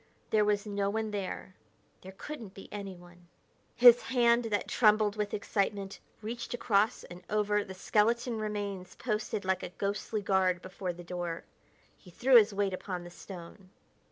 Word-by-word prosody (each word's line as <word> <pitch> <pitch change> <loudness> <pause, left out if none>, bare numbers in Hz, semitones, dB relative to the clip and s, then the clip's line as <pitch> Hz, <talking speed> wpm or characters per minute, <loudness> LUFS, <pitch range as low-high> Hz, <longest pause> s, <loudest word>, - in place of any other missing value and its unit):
There 215 -1 +4
was 205 0 +1
no 200 -1 -1
one 220 +1 -2
there; 195 -2 -4 0.5
there 190 +1 -10
couldn't 235 -10 -8
be 195 - -10
anyone. 175 -3 -9 0.5
His 240 0 +8
hand, 240 -2 +3
that 210 -2 -1
trembled 215 -2 +3
with 210 -1 -2
excitement, 200 -1 -2 0.2
reached 235 +2 -4
across 210 -2 +1
and 175 +1 -11
over 210 -1 +1
the 190 -1 -9
skeleton 230 +4 +1
remains 205 -3 -4
posted 215 -3 -2
like 190 0 +1
a - - -5
ghostly 200 +3 -3
guard 190 -2 +2
before 185 -1 -4
the 175 0 -10
door. 175 -1 -4 0.6
He 180 - -16
threw 255 +9 +3
his 220 -2 +8
weight 200 -1 0
upon 185 -1 -4
the 175 - -10
stone. 185 +1 -11
205 Hz, 155 wpm, -31 LUFS, 185-215 Hz, 0.6 s, His